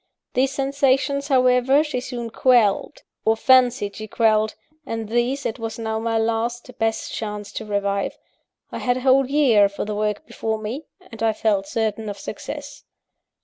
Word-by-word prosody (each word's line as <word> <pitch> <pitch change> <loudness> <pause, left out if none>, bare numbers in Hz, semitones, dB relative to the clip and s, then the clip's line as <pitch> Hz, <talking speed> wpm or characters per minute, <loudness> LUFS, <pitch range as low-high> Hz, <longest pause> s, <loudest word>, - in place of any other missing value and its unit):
These 265 +2 +2
sensations, 275 0 +1
however, 255 +1 +4
she 295 -5 -3
soon 240 -2 -5
quelled, 235 -5 +2 0.2
or 225 0 +2
fancied 245 -4 +3
she 215 - -6
quelled; 215 -1 +2 0.3
and 225 -5 -4
these, 240 +4 0
it 220 - -3
was 225 -1 -4
now 220 -1 -2
my 225 0 0
last, 230 +2 -1
best 225 0 -1
chance 210 -2 -5
to 220 - -6
revive. 200 -1 -1 0.5
I - - -5
had 245 0 +1
a - - -4
whole 265 0 +4
year 245 -9 +4
for 200 - -5
the 210 - -3
work 210 +6 -2
before 220 -7 -3
me; 225 +8 -6 0.2
and 225 - -10
I 225 -1 +2
felt 205 -3 0
certain 220 -1 -2
of 200 - -6
success. - - -7
225 Hz, 165 wpm, -22 LUFS, 215-255 Hz, 0.5 s, however